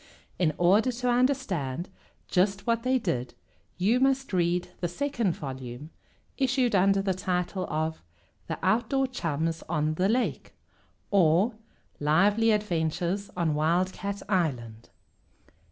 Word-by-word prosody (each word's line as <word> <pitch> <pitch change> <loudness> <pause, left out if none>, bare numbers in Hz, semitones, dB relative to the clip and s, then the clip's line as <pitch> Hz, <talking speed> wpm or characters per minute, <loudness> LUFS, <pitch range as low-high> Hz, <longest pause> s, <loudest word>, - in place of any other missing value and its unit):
In 170 -4 +3
order 200 +8 +4
to 250 +1 -2
understand 205 - 0 0.4
just 195 +2 +1
what 230 -1 +1
they 255 +2 +2
did 130 - -3 0.4
you 210 +7 +2
must 270 -3 +1
read 175 0 +1
the 175 - -1
second 235 -1 -1
volume, 130 +1 -7 0.5
issued 260 -3 +2
under 195 +1 +3
the 195 -1 +1
title 185 0 -2
of 160 +1 -2 0.5
"The - - -3
Outdoor 240 +4 +2
Chums 165 - -2
on 155 -2 0
the 185 +5 +1
Lake; 245 +3 -1 0.6
or, 190 +3 +4 0.5
Lively 200 +10 +3
Adventures 180 -1 0
on 165 -3 +1
Wildcat 185 +6 -1
Island." 125 - -2
185 Hz, 120 wpm, -27 LUFS, 160-225 Hz, 0.6 s, order